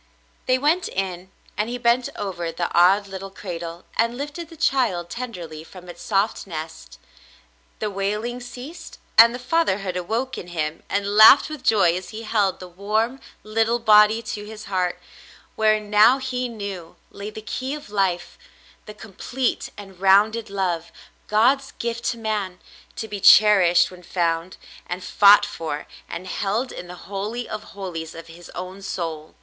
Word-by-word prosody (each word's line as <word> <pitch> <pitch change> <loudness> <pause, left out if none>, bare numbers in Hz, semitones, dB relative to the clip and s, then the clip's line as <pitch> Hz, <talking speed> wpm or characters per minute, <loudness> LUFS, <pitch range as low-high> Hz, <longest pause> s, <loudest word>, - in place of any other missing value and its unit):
They 255 0 +4
w^ent 315 +7 +1
in, 190 -1 -4 0.3
and 210 +3 -1
he 245 - -3
bent 240 +1 +2
over 175 -5 -4
the 170 +1 -3
odd 190 +4 +5
little 195 0 -7
cradle 170 -3 -7
and 230 +1 +1
lifted 295 +4 -6
the 330 - -13
child 185 - +1
tenderly 175 -11 -6
from 180 +2 -13
its 175 - -10
soft 200 0 0
nest. 160 - -8 0.8
The 210 -1 -3
wailing 210 +5 -2
ceased, 250 +7 -10 0.2
and 230 +1 +9
the 245 - -5
fatherhood 245 - 0
awoke 225 +9 -2
in 175 - -9
him 160 -2 -3
and 200 0 -1
laughed 220 +8 +8
with 305 -3 -6
joy 195 -8 +3
as 185 0 -6
he 220 +1 -7
held 210 -4 0
the 185 - -9
warm 215 +8 -1 0.2
little 225 +2 +1
body 215 0 +5
to 210 -1 -5
his 215 +1 -9
heart, 185 -2 -1 0.6
wherein 215 -1 +1
now, 215 +5 +6
he 255 -2 -3
knew, 200 -7 -7 0.2
lay 200 +1 -7
the 215 - -9
key 260 +5 -4
of 290 -8 -11
life 190 - -1 0.2
— - - -28
the 210 - -9
complete 235 +5 -3
and 195 -3 -11
rounded 210 +3 +4
love, 180 -4 -2 0.4
God's 255 +6 +2
gift 235 0 -4
to 235 - -1
man, 210 -5 -3 0.4
to 220 - -5
be 205 -1 -5
cherished 190 -5 +6
when 180 -1 -13
found, 170 0 -2 0.3
and 180 +1 -5
fought 205 +2 +6
for 160 -7 -5 0.2
and 170 +2 -6
held 205 +7 -2
in 175 - -8
the 180 - -9
holy 210 +5 -4
of 215 0 -6
holies 165 -5 -6
of 165 0 -9
his 165 +1 -13
own 185 +2 -7
soul. 165 -5 -5
205 Hz, 165 wpm, -23 LUFS, 180-230 Hz, 0.8 s, and